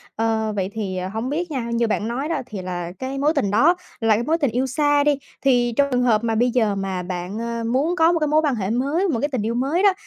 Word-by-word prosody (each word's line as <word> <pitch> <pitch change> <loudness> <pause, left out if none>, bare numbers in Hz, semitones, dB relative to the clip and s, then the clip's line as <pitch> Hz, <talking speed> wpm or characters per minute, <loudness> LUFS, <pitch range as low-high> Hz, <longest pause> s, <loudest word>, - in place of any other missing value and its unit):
Ờ, 220 -1 0
vậy 190 -2 -1
thì, 195 -4 -3
hổng 220 +7 -3
biết 335 +4 -2
nha, 265 -5 -2
như 235 0 +1
bạn 215 0 -1
nói 260 +6 -3
đó 315 -5 -1
thì 205 -5 -7
là 175 -1 -4
cái 265 +1 -4
mối 295 +3 +2
tình 205 -9 +1
đó 290 - +4 0.2
là 225 -1 +3
cái 225 - -1
mối 320 +6 +1
tình 285 -7 0
yêu 250 +3 0
xa 290 +2 +2
đi, 290 -1 +2 0.2
thì 245 -3 +2
trong 280 - +4
trường 250 0 +2
hợp 230 -3 +3
mà 225 -1 0
bây 240 +2 +2
giờ 220 -4 +1
mà 190 -2 -3
bạn, 180 +3 -5
ơ, 235 0 -3
muốn 265 +9 0
có 330 -1 +4
một 340 - +1
cái 305 - +1
mối 305 +1 +3
quan 290 -5 +1
hệ 195 -4 -2
mới, 280 - 0
một 260 -10 0
cái 290 - 0
tình 255 -5 -1
yêu 230 +2 -1
mới 280 +9 0
đó, 400 -2 +6
240 Hz, 280 wpm, -22 LUFS, 215-290 Hz, 0.2 s, đó